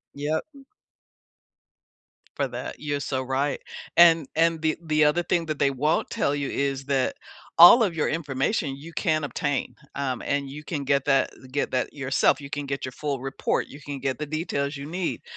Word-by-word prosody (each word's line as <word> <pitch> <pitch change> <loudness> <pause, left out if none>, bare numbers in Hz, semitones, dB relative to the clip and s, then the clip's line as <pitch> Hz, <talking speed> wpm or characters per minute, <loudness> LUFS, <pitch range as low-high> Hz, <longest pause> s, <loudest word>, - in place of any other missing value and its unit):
Yep. 150 +2 -2 1.9
For - - 0
that, - - -6
you're 145 -1 -2
so 135 -2 -2
right. 135 +2 -1 0.3
And 165 -4 +6
and 165 0 +2
the 160 -1 +1
the 155 -1 +3
other 160 +4 +2
thing 170 0 0
that 155 -2 -3
they 140 - +3
won't 145 +4 0
tell 140 - 0
you 140 -1 -2
is 140 -1 -2
that 135 -2 0 0.4
all 175 +8 +10
of 195 -7 +1
your 155 - 0
information 145 - -1
you 150 +5 -11
can 155 -3 0
obtain, 145 -2 -2 0.2
um, 135 -3 -2
and 140 -1 -1
you 150 +2 -8
can 150 -4 -3
get 140 0 +1
that 135 -2 +3 0.2
get 145 +2 -1
that 130 -1 -1
yourself. 135 0 +1
You 140 - -8
can 145 0 -4
get 140 0 -4
your 130 - -4
full 140 0 -3
report, 135 0 -1
you 140 - -12
can 145 -1 -6
get 135 -1 -2
the 150 - -2
details 145 -2 -2
you 140 0 -7
need. 175 +3 -3
145 Hz, 190 wpm, -25 LUFS, 135-155 Hz, 1.9 s, all